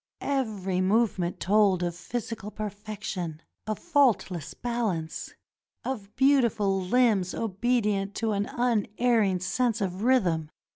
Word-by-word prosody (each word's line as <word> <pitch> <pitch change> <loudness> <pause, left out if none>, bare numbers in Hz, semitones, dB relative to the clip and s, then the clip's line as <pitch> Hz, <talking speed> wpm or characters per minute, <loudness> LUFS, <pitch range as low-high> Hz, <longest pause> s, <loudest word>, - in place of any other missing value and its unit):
Every 210 -9 -1
movement 190 -3 +1
told 195 -2 +3
of 175 -1 -1
physical 225 +2 -5
perfection, 205 -6 -5 0.3
of 215 -1 -1
faultless 250 - +1
balance, 215 -10 -3 0.5
of 210 -6 -5
beautiful 235 -8 +3
limbs 200 -2 +2
obedient 210 -2 0
to 225 -1 0
an 205 0 0
unerring 225 -3 +1
sense 235 +4 0
of 190 -2 -2
rhythm. 185 -11 +2
210 Hz, 105 wpm, -27 LUFS, 185-235 Hz, 0.5 s, told